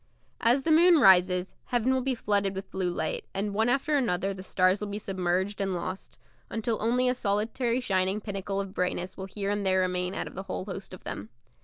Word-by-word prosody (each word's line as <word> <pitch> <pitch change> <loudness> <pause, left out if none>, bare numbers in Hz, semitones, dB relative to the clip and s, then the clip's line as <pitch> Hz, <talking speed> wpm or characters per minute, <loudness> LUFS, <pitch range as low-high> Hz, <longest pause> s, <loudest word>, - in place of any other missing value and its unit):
As 245 +4 +3
the 325 - +1
moon 335 +1 +6
rises, 185 -4 +5
heaven 245 +1 +1
will 260 - +1
be 260 0 -1
flooded 200 -3 0
with 190 +1 -7
blue 185 -2 -1
light, 475 - -2
and 200 +1 -1
one 220 +3 +2
after 275 +4 +1
another 195 -7 0
the 190 - -8
stars 185 +1 +2
will 210 - -3
be 200 0 -4
submerged 190 0 -1
and 195 -2 -1
lost, 185 +2 -6 0.3
until 225 0 -2
only 245 +3 +2
a 250 - +3
solitary 230 +2 0
shining 190 -3 0
pinnacle 200 -1 -4
of 195 -1 -4
brightness 180 -1 -2
will 190 - -6
here 200 +1 -3
and 205 0 -1
there 190 -1 +3
remain 180 0 -1
out - - -2
of - - -9
the 190 - -5
whole - - -3
host 190 -1 -7
of - - -17
them. 105 +2 -6
200 Hz, 215 wpm, -28 LUFS, 185-235 Hz, 0.3 s, moon